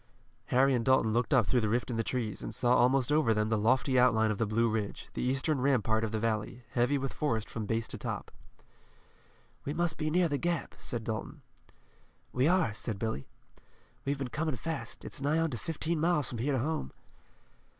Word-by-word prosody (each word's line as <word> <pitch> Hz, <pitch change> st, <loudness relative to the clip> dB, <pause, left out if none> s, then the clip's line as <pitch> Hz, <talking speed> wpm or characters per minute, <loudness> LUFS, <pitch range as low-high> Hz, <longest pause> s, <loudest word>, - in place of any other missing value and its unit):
Harry 135 Hz, +2 st, +3 dB
and 120 Hz, -2 st, +1 dB
Dalton 125 Hz, -3 st, +3 dB
looked 120 Hz, +5 st, 0 dB
up 125 Hz, -6 st, +5 dB
through 125 Hz, +4 st, +2 dB
the 110 Hz, -, 0 dB
rift 120 Hz, +3 st, 0 dB
in -, -, -2 dB
the 115 Hz, -, 0 dB
trees, 115 Hz, -5 st, -3 dB
and -, -, -5 dB
saw 125 Hz, -1 st, +3 dB
almost 130 Hz, +2 st, +3 dB
over 150 Hz, -7 st, +3 dB
them 105 Hz, 0 st, +1 dB
the 110 Hz, -, +2 dB
lofty 130 Hz, +4 st, +3 dB
outline 110 Hz, -3 st, +4 dB
of 105 Hz, -, -3 dB
the 115 Hz, -, +1 dB
Blue 115 Hz, +2 st, +2 dB
Ridge, 110 Hz, -2 st, -3 dB
the -, -, -3 dB
eastern 135 Hz, +2 st, 0 dB
rampart 115 Hz, -5 st, +2 dB
of 110 Hz, -, -1 dB
the 110 Hz, -, -1 dB
valley, 115 Hz, +2 st, -2 dB
heavy 125 Hz, +4 st, +2 dB
with 135 Hz, -1 st, -3 dB
forest 115 Hz, -8 st, -1 dB
from 110 Hz, -2 st, -4 dB
base 115 Hz, +1 st, -1 dB
to -, -, -6 dB
top. -, -, -4 dB, 1.3 s
"We 145 Hz, -, -3 dB
must 170 Hz, -1 st, -1 dB
be 155 Hz, -1 st, 0 dB
near 175 Hz, +2 st, +3 dB
the 145 Hz, -3 st, -1 dB
Gap," 170 Hz, -3 st, -1 dB
said 120 Hz, -3 st, -4 dB
Dalton. 110 Hz, -1 st, -5 dB, 0.9 s
"We 130 Hz, +3 st, +3 dB
are," 175 Hz, -, +3 dB
said 110 Hz, -1 st, -3 dB
Billy. 110 Hz, -10 st, -3 dB, 0.8 s
"We've 140 Hz, +1 st, -1 dB
been 135 Hz, -2 st, -4 dB
coming 155 Hz, +2 st, -1 dB
fast. 160 Hz, +3 st, -5 dB
It's 140 Hz, -, -6 dB
nigh 145 Hz, +3 st, +1 dB
on 165 Hz, -1 st, +1 dB
to 120 Hz, -, -3 dB
fifteen 165 Hz, +3 st, -2 dB
miles 165 Hz, -3 st, +1 dB
from 120 Hz, -, -5 dB
here 140 Hz, +5 st, 0 dB
to -, -, +2 dB
home." 140 Hz, -, -2 dB
125 Hz, 210 wpm, -31 LUFS, 110-145 Hz, 1.3 s, up